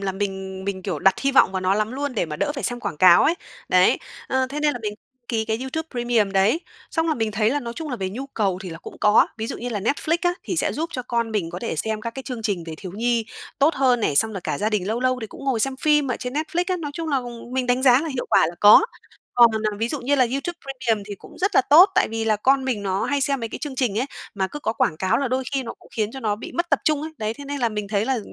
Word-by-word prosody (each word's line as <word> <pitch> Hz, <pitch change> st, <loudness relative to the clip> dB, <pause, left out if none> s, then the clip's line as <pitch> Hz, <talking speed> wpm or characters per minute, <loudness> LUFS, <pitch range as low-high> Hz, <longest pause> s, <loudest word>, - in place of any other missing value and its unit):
là 195 Hz, -1 st, -2 dB
mình 190 Hz, -1 st, -4 dB
mình, 190 Hz, -1 st, -3 dB
kiểu, 180 Hz, -6 st, -3 dB
đặt 190 Hz, +4 st, +4 dB
hy 275 Hz, 0 st, +1 dB
vọng 260 Hz, -, +5 dB
vào 190 Hz, -, -1 dB
nó 185 Hz, +1 st, +2 dB
lắm 215 Hz, +3 st, -1 dB
luôn 285 Hz, 0 st, -3 dB
để 210 Hz, -, 0 dB
mà 150 Hz, -1 st, -5 dB
đỡ 290 Hz, -, -1 dB
phải 275 Hz, -, -5 dB
xem 245 Hz, -1 st, -2 dB
quảng -, -, -4 dB
cáo 175 Hz, +2 st, +7 dB
ấy, 330 Hz, -, +3 dB, 0.3 s
đấy, -, -, +4 dB, 0.3 s
ờ, 260 Hz, 0 st, +1 dB
thế 285 Hz, +3 st, -5 dB
nên 300 Hz, 0 st, +2 dB
là 245 Hz, -, -5 dB
mình 210 Hz, -1 st, -3 dB, 0.3 s
ký 225 Hz, -2 st, 0 dB
cái 220 Hz, 0 st, -1 dB
YouTube 310 Hz, +5 st, -4 dB
Premium 240 Hz, -5 st, +1 dB
đấy, 200 Hz, -, +3 dB, 0.3 s
xong 325 Hz, 0 st, 0 dB
là 315 Hz, -, +2 dB
mình 225 Hz, -4 st, -1 dB
thấy 215 Hz, +2 st, +2 dB
là 290 Hz, +3 st, 0 dB
nói 235 Hz, -2 st, -5 dB
chung 320 Hz, -3 st, -5 dB
là 250 Hz, -, -2 dB
về 190 Hz, -3 st, -3 dB
nhu 255 Hz, +7 st, -6 dB
cầu 200 Hz, -8 st, -1 dB
thì 185 Hz, -, -6 dB
là 165 Hz, -, -8 dB
cũng -, -, -11 dB
có, 210 Hz, +1 st, +5 dB
ví 220 Hz, -, -2 dB
dụ 260 Hz, -, -5 dB
như 245 Hz, -, -4 dB
là 210 Hz, -4 st, -3 dB
Netflix 305 Hz, -, 0 dB
á 350 Hz, 0 st, +2 dB
thì 360 Hz, -, -3 dB
sẽ -, -, +1 dB
giúp 325 Hz, +3 st, -3 dB
cho 255 Hz, -, -3 dB
con 235 Hz, -2 st, -1 dB
mình 195 Hz, -6 st, -1 dB
có 175 Hz, -, -5 dB
thể 230 Hz, -5 st, -4 dB
xem 220 Hz, +6 st, -2 dB
các 230 Hz, -, -4 dB
cái 265 Hz, +3 st, -7 dB
chương 250 Hz, -4 st, -6 dB
trình 195 Hz, -6 st, -1 dB
về 160 Hz, -, -5 dB
thiếu 185 Hz, +1 st, -8 dB
nhi 230 Hz, +1 st, 0 dB, 0.3 s
tốt 290 Hz, +3 st, +4 dB
hơn 255 Hz, -3 st, +3 dB
này, 150 Hz, -9 st, 0 dB
xong 220 Hz, +7 st, +3 dB
là 195 Hz, -, -5 dB
cả 170 Hz, -, -3 dB
gia 215 Hz, +2 st, 0 dB
đình 205 Hz, -4 st, 0 dB
lâu 225 Hz, +3 st, -1 dB
lâu 255 Hz, 0 st, +1 dB
thì 220 Hz, -, -4 dB
cũng 270 Hz, -, -11 dB
ngồi 260 Hz, -5 st, 0 dB
xem 270 Hz, +3 st, 0 dB
phim 295 Hz, 0 st, +2 dB
ở 245 Hz, -, 0 dB
trên 250 Hz, 0 st, -5 dB
Netflix 315 Hz, +4 st, -1 dB
á, 370 Hz, -, +1 dB
nói 310 Hz, -4 st, -5 dB
chung 330 Hz, 0 st, -4 dB
là 275 Hz, -3 st, +1 dB, 0.3 s
mình 255 Hz, -1 st, 0 dB
đánh 250 Hz, +1 st, +1 dB
giá 255 Hz, -1 st, +6 dB
là 325 Hz, -, -3 dB
hiệu 265 Hz, -4 st, -3 dB
quả -, -, +5 dB
là 170 Hz, -, -5 dB
có. 210 Hz, -, +9 dB, 0.5 s
Còn, 240 Hz, -1 st, +7 dB, 0.2 s
à, -, -, -6 dB
ví 225 Hz, +2 st, 0 dB
dụ 290 Hz, +2 st, -3 dB
như 275 Hz, +4 st, +1 dB
là 260 Hz, -3 st, +4 dB
YouTube 275 Hz, +6 st, -2 dB
Premium 255 Hz, -6 st, -1 dB
thì 205 Hz, -, -5 dB
cũng -, -, -15 dB
rất 395 Hz, +3 st, 0 dB
là -, -, +7 dB
tốt, 345 Hz, +7 st, +9 dB
tại 370 Hz, -, +3 dB
vì 225 Hz, 0 st, -3 dB
là 215 Hz, -1 st, +2 dB
con 265 Hz, +5 st, +2 dB
mình 245 Hz, -6 st, -1 dB
nó 195 Hz, -1 st, -1 dB
hay 285 Hz, 0 st, 0 dB
xem 275 Hz, -1 st, 0 dB
mấy 230 Hz, -, -3 dB
cái -, -, -6 dB
chương 290 Hz, -3 st, -5 dB
trình 230 Hz, -5 st, 0 dB
ấy, 255 Hz, -, 0 dB, 0.3 s
mà 195 Hz, -2 st, 0 dB
cứ 295 Hz, -, -7 dB
có 220 Hz, -, -1 dB
quảng 160 Hz, -8 st, 0 dB
cáo 190 Hz, +8 st, +1 dB
là 275 Hz, -, -1 dB
đôi 260 Hz, +1 st, -1 dB
khi 270 Hz, -, +1 dB
nó 230 Hz, -, -7 dB
cũng -, -, -19 dB
khiến 215 Hz, -2 st, 0 dB
cho 265 Hz, -, -7 dB
nó 210 Hz, -3 st, 0 dB
bị -, -, -9 dB
mất 345 Hz, 0 st, -2 dB
tập -, -, +4 dB
trung 300 Hz, -2 st, +2 dB
ấy, 315 Hz, -, -5 dB
đấy, 215 Hz, 0 st, -2 dB
thế 285 Hz, -, -10 dB
nên 285 Hz, 0 st, -4 dB
là 235 Hz, -, +2 dB
mình 210 Hz, -2 st, -4 dB
thấy 205 Hz, 0 st, 0 dB
là 260 Hz, 0 st, 0 dB
240 Hz, 315 wpm, -23 LUFS, 205-275 Hz, 0.5 s, có